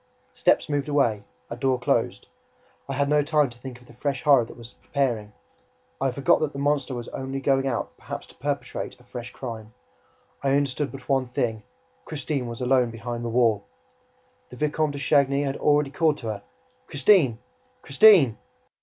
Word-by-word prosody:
Steps -, -, +2 dB
moved 145 Hz, -1 st, -1 dB
away, 120 Hz, -8 st, +1 dB, 0.2 s
a 115 Hz, -, -6 dB
door 130 Hz, +1 st, +1 dB
closed. 125 Hz, -, 0 dB, 0.6 s
I -, -, -1 dB
had 140 Hz, +1 st, +1 dB
no 150 Hz, +1 st, +3 dB
time 145 Hz, -2 st, +2 dB
to 120 Hz, -, -15 dB
think 125 Hz, -1 st, -9 dB
of 125 Hz, -, -19 dB
the -, -, -16 dB
fresh 135 Hz, +1 st, -3 dB
horror 140 Hz, -5 st, +6 dB
that -, -, -13 dB
was 120 Hz, 0 st, -11 dB
preparing; 120 Hz, -7 st, -1 dB, 0.7 s
I 135 Hz, -, +2 dB
forgot 135 Hz, +2 st, +3 dB
that 155 Hz, -2 st, -1 dB
the -, -, -7 dB
monster 140 Hz, -2 st, 0 dB
was 120 Hz, -1 st, -6 dB
only 135 Hz, 0 st, -4 dB
going 135 Hz, 0 st, +1 dB
out -, -, -3 dB
perhaps -, -, -7 dB
to -, -, -18 dB
perpetrate -, -, -4 dB
a -, -, -19 dB
fresh 120 Hz, 0 st, -8 dB
crime; 110 Hz, -4 st, -8 dB, 0.7 s
I 135 Hz, 0 st, +2 dB
understood 140 Hz, 0 st, -1 dB
but 135 Hz, -2 st, -11 dB
one 135 Hz, -2 st, +1 dB
thing: 115 Hz, -3 st, -2 dB, 0.4 s
Christine 145 Hz, -4 st, -3 dB
was 115 Hz, +1 st, -7 dB
alone 125 Hz, -1 st, +3 dB
behind 120 Hz, +1 st, -5 dB
the 120 Hz, -, -2 dB
wall! 115 Hz, -4 st, +2 dB, 0.8 s
The -, -, -11 dB
Vicomte 150 Hz, +2 st, 0 dB
de -, -, -5 dB
Chagny 140 Hz, 0 st, +2 dB
was 135 Hz, 0 st, -2 dB
already 145 Hz, -2 st, +2 dB
calling 155 Hz, 0 st, +2 dB
to 115 Hz, -, -5 dB
her: 100 Hz, -2 st, -5 dB, 0.4 s
"Christine! 140 Hz, -, +4 dB, 0.5 s
Christine!" 150 Hz, -, +6 dB
135 Hz, 180 wpm, -25 LUFS, 120-145 Hz, 0.8 s, horror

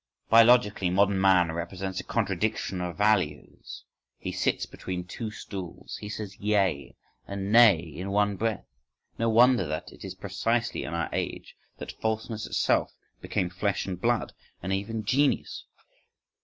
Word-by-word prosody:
Biologically, 115 Hz, -5 st, +5 dB
modern 100 Hz, +1 st, +2 dB
man 90 Hz, -3 st, +4 dB
represents 90 Hz, +3 st, -4 dB
a -, -, -5 dB
contradiction 100 Hz, -2 st, -1 dB
of 90 Hz, -1 st, -4 dB
values, 95 Hz, -8 st, -1 dB, 0.3 s
he -, -, -5 dB
sits -, -, 0 dB
between 90 Hz, -1 st, -6 dB
two 110 Hz, +5 st, -5 dB
stools, 95 Hz, -5 st, -8 dB
he 105 Hz, -, -8 dB
says 105 Hz, -2 st, -6 dB
yea 100 Hz, -8 st, 0 dB, 0.3 s
and 100 Hz, 0 st, -4 dB
nay 115 Hz, -5 st, +8 dB
in 85 Hz, +4 st, -7 dB
one 100 Hz, 0 st, +2 dB
breath. 110 Hz, +1 st, -2 dB, 0.5 s
No 115 Hz, 0 st, +2 dB
wonder 120 Hz, -, +5 dB
that 80 Hz, +1 st, -4 dB
it -, -, -14 dB
is 95 Hz, -1 st, -6 dB
precisely 110 Hz, +5 st, -1 dB
in 85 Hz, -, -4 dB
our 85 Hz, 0 st, -1 dB
age -, -, -4 dB, 0.2 s
that -, -, -7 dB
falseness 110 Hz, 0 st, -2 dB
itself -, -, +1 dB, 0.3 s
became 90 Hz, -1 st, -2 dB
flesh 100 Hz, +2 st, -1 dB
and 90 Hz, -2 st, -5 dB
blood, 120 Hz, -1 st, 0 dB, 0.3 s
and 95 Hz, +2 st, -1 dB
even 105 Hz, +3 st, -3 dB
genius! 135 Hz, +6 st, +1 dB
100 Hz, 145 wpm, -27 LUFS, 90-110 Hz, 0.5 s, nay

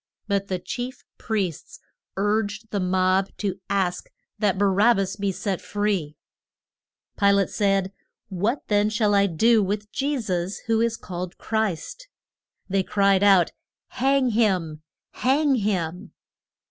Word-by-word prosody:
But 200 Hz, -1 st, 0 dB
the 185 Hz, -, -1 dB
chief 245 Hz, +7 st, -6 dB, 0.2 s
priests 195 Hz, -8 st, -3 dB, 0.4 s
urged 210 Hz, +1 st, -1 dB
the 205 Hz, -, -1 dB
mob 185 Hz, +1 st, +2 dB
to 195 Hz, -2 st, -3 dB
ask 190 Hz, -3 st, -1 dB, 0.3 s
that 205 Hz, -3 st, +1 dB
Ba 200 Hz, -, +2 dB
rab 205 Hz, +4 st, +4 dB
bas 195 Hz, -1 st, -1 dB
be 200 Hz, -1 st, -1 dB
set 195 Hz, -1 st, -3 dB
free. 200 Hz, -8 st, -2 dB, 1.0 s
Pi 200 Hz, -1 st, +4 dB
late 200 Hz, -1 st, +2 dB
said, 195 Hz, -2 st, +1 dB, 0.3 s
What 205 Hz, +8 st, -1 dB
then 205 Hz, 0 st, +2 dB
shall 210 Hz, -1 st, +1 dB
I 200 Hz, 0 st, +4 dB
do 220 Hz, +6 st, +3 dB
with 205 Hz, +2 st, -3 dB
Je 280 Hz, 0 st, -1 dB
sus, 185 Hz, -3 st, -2 dB
who 225 Hz, 0 st, +2 dB
is 230 Hz, -1 st, 0 dB
called 180 Hz, 0 st, -6 dB
Christ? 220 Hz, -, -3 dB, 0.6 s
They 195 Hz, 0 st, +1 dB
cried 195 Hz, 0 st, +2 dB
out, 195 Hz, -4 st, +5 dB, 0.4 s
Hang 270 Hz, 0 st, +2 dB
him! 185 Hz, -9 st, 0 dB, 0.3 s
Hang 280 Hz, +3 st, +2 dB
him! 190 Hz, -3 st, -2 dB
200 Hz, 135 wpm, -24 LUFS, 185-220 Hz, 1.0 s, out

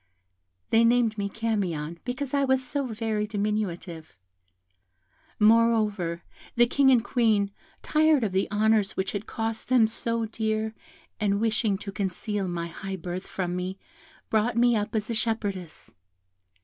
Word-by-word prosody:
"They 225 Hz, +1 st, +5 dB
named 230 Hz, -1 st, +3 dB
me 200 Hz, 0 st, -1 dB
Camion, 185 Hz, -8 st, -2 dB
because 255 Hz, +2 st, -4 dB
I 280 Hz, -1 st, +3 dB
was 265 Hz, -1 st, +2 dB
so 280 Hz, -1 st, -2 dB
very 220 Hz, -2 st, -2 dB
diminutive. 200 Hz, -, -3 dB, 1.2 s
Moreover, 215 Hz, -6 st, +3 dB, 0.3 s
the 240 Hz, -, +6 dB
King 270 Hz, +3 st, +3 dB
and 245 Hz, -4 st, +5 dB
Queen, 220 Hz, -5 st, +2 dB, 0.3 s
tired 310 Hz, -3 st, +3 dB
of 210 Hz, -, 0 dB
the 190 Hz, +1 st, 0 dB
honours 215 Hz, -1 st, +2 dB
which 190 Hz, 0 st, -1 dB
had 205 Hz, +1 st, -5 dB
cost 225 Hz, 0 st, -3 dB
them 250 Hz, -3 st, +5 dB
so 230 Hz, +1 st, -1 dB
dear, 220 Hz, 0 st, -2 dB, 0.5 s
and 200 Hz, -1 st, +1 dB
wishing 220 Hz, -2 st, +1 dB
to 200 Hz, 0 st, -7 dB
conceal 195 Hz, +1 st, -2 dB
my 170 Hz, -1 st, -3 dB
high 190 Hz, +3 st, -6 dB
birth 180 Hz, +1 st, -6 dB
from 180 Hz, -2 st, -3 dB
me, 185 Hz, +1 st, -3 dB, 0.5 s
brought 220 Hz, +2 st, +1 dB
me 240 Hz, 0 st, +4 dB
up 210 Hz, +1 st, -2 dB
as 215 Hz, -1 st, -1 dB
a -, -, 0 dB
shepherdess. 205 Hz, -6 st, -3 dB
215 Hz, 145 wpm, -26 LUFS, 195-230 Hz, 1.2 s, the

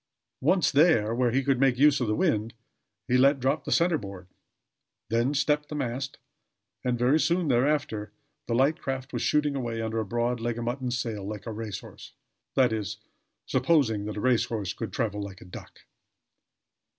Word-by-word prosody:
Once 180 Hz, -7 st, +3 dB
there, 140 Hz, -8 st, +4 dB
where 125 Hz, +1 st, +2 dB
he 135 Hz, +3 st, +1 dB
could 135 Hz, -2 st, +1 dB
make 135 Hz, -2 st, +3 dB
use 145 Hz, 0 st, +4 dB
of 120 Hz, -, 0 dB
the 105 Hz, -, +1 dB
wind, 115 Hz, -, 0 dB, 0.5 s
he 125 Hz, -, +3 dB
let 135 Hz, +2 st, +4 dB
drop 135 Hz, +5 st, 0 dB
the -, -, -4 dB
center 170 Hz, -2 st, +3 dB
board; 95 Hz, -2 st, -9 dB, 0.8 s
then 120 Hz, +4 st, +2 dB
stepped 150 Hz, +1 st, +1 dB
the 150 Hz, -, -5 dB
mast, 135 Hz, 0 st, -3 dB, 0.7 s
and 125 Hz, -1 st, 0 dB
very 125 Hz, +6 st, +3 dB
soon 170 Hz, 0 st, +1 dB
thereafter 120 Hz, -5 st, 0 dB, 0.4 s
the 115 Hz, -, 0 dB
light 140 Hz, +7 st, +2 dB
craft 135 Hz, 0 st, -4 dB
was -, -, -2 dB
shooting 150 Hz, -1 st, +1 dB
away 120 Hz, -4 st, -3 dB
under 115 Hz, 0 st, -2 dB
a -, -, 0 dB
broad 120 Hz, +3 st, -1 dB
leg 115 Hz, 0 st, -2 dB
of 120 Hz, -, -3 dB
mutton 125 Hz, +2 st, -2 dB
sail, 115 Hz, -4 st, -3 dB
like 105 Hz, 0 st, -6 dB
a 115 Hz, -, -4 dB
race 105 Hz, -3 st, -5 dB
horse, -, -, -13 dB, 0.4 s
that 125 Hz, -4 st, +4 dB
is, 105 Hz, -1 st, -3 dB, 0.5 s
supposing 120 Hz, -11 st, +2 dB
that 105 Hz, 0 st, -5 dB
a -, -, -3 dB
race 125 Hz, -2 st, +3 dB
horse 105 Hz, -5 st, -3 dB
could 115 Hz, -, -5 dB
travel 105 Hz, -4 st, -2 dB
like 100 Hz, -2 st, -7 dB
a -, -, -13 dB
duck. 90 Hz, -, -11 dB
125 Hz, 185 wpm, -27 LUFS, 110-140 Hz, 0.8 s, there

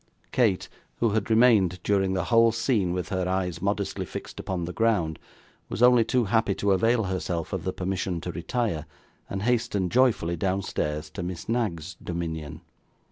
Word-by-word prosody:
Kate, 110 Hz, -7 st, +2 dB, 0.3 s
who 115 Hz, -2 st, +1 dB
had 110 Hz, +1 st, -1 dB
remained 110 Hz, -6 st, +4 dB
during 95 Hz, -2 st, +1 dB
the 95 Hz, -, 0 dB
whole 115 Hz, +4 st, +5 dB
scene 110 Hz, -5 st, +1 dB
with 90 Hz, +1 st, -3 dB
her 95 Hz, -2 st, -1 dB
eyes 90 Hz, -3 st, -1 dB
modestly 100 Hz, +1 st, -1 dB
fixed -, -, -8 dB
upon 90 Hz, -3 st, -3 dB
the 90 Hz, -, -5 dB
ground, 100 Hz, -9 st, +1 dB, 0.5 s
was 120 Hz, -, -1 dB
only 125 Hz, -1 st, +7 dB
too 120 Hz, +2 st, +1 dB
happy 110 Hz, -2 st, +1 dB
to 100 Hz, -, +1 dB
avail 115 Hz, +4 st, +3 dB
herself 90 Hz, -2 st, -3 dB
of 95 Hz, -4 st, -3 dB
the 95 Hz, -, 0 dB
permission 95 Hz, -1 st, -2 dB
to 90 Hz, -, -5 dB
retire, 85 Hz, -3 st, -2 dB, 0.4 s
and 95 Hz, 0 st, -3 dB
hasten 110 Hz, -6 st, +1 dB
joyfully 115 Hz, -9 st, +2 dB
downstairs 80 Hz, -4 st, -2 dB
to -, -, -6 dB
Miss 90 Hz, -1 st, -5 dB
Knag's 95 Hz, -8 st, -2 dB
dominion. 80 Hz, -4 st, -4 dB
95 Hz, 165 wpm, -26 LUFS, 90-115 Hz, 0.5 s, only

